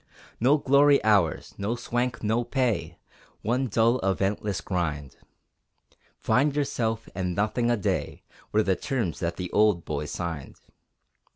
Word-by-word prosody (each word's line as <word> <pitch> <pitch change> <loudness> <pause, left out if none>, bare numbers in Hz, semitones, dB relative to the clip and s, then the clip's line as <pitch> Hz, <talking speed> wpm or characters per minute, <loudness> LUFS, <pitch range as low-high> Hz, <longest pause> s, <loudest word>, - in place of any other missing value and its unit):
No 135 +6 +4
glory 140 0 +5
ours, 100 -7 +2
no 105 +4 -1
swank, 120 0 -2
no 110 +3 +1
pay, 115 - -1 0.5
One 125 +5 0
dull 115 +3 +2
eventless 95 0 -1
grind; 80 -6 -3 1.0
Find 135 +6 +1
yourself, 115 -6 -1
and 90 -1 -2
nothing 110 +4 0
a 120 - +2
day 100 - -2 0.3
Were 110 +1 +3
the 95 -2 +1
terms 120 - -2
that 85 -1 -2
the 90 -1 -5
old 105 -5 +3
boys 75 0 -3
signed. 80 -5 -5
110 Hz, 130 wpm, -26 LUFS, 90-120 Hz, 1.0 s, glory